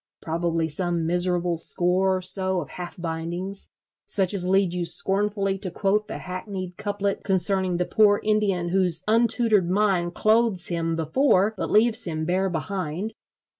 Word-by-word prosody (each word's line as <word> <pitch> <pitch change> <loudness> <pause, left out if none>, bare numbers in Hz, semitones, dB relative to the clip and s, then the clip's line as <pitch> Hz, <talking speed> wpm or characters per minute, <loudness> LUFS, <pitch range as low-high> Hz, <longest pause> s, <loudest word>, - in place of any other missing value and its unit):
Probably 165 0 -2
some 170 +1 -3
miserable 175 0 +1
score 185 +3 +2
or 185 - -7
so 190 0 +2
of 155 - -7
half 175 0 -9
bindings, 170 +4 -5 0.4
such 195 - +2
as 180 -3 +2
lead 190 -1 +2
you 180 -1 -2
scornfully 195 +3 0
to 185 - +1
quote 205 +4 -1
the - - -6
hackneyed 185 0 -7
couplet 200 0 -3
concerning 190 -1 +2
the 180 - -1
poor 205 0 +3
Indian 205 -5 0
whose 180 -2 +3
untutored 225 -4 +2
mind 185 -3 0
clothes 215 -4 +1
him 165 -1 -2
before 190 - +1
but - - -4
leaves 225 +1 +4
him 160 -2 -4
bare 185 +3 0
behind. 185 +3 -4
185 Hz, 150 wpm, -24 LUFS, 175-200 Hz, 0.4 s, leaves